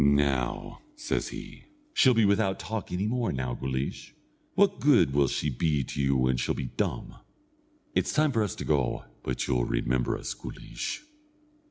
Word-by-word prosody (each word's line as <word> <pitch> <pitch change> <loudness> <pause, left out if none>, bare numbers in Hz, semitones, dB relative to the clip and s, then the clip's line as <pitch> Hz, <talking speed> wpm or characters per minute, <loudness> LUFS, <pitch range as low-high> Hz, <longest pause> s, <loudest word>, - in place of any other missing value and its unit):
"Now," 70 -3 +1 0.2
says 310 - -1
he, - - -9 0.3
"she'll 130 -2 +5
be 110 -1 +5
without 100 -1 +2
talk 105 +1 -4
any 90 +3 -1
more; 120 +1 0
now, 65 -2 -2
Guleesh, 65 +1 -4 0.4
what 200 0 +4
good 130 - +5
will 70 -1 +4
she 75 +3 -1
be 75 +1 +1
to 70 - -4
you 70 -1 +3
when 65 0 +2
she'll 60 - 0
be 65 -2 -4
dumb? - - -2 0.8
It's - - +1
time 155 0 +3
for 115 -4 +1
us 105 -4 -1
to - - -5
go 70 -5 +1 0.2
but 65 - -2
you'll - - +1
remember 60 +1 0
us, - - -4
Guleesh!" 295 - -6
70 Hz, 170 wpm, -28 LUFS, -, 0.8 s, she'll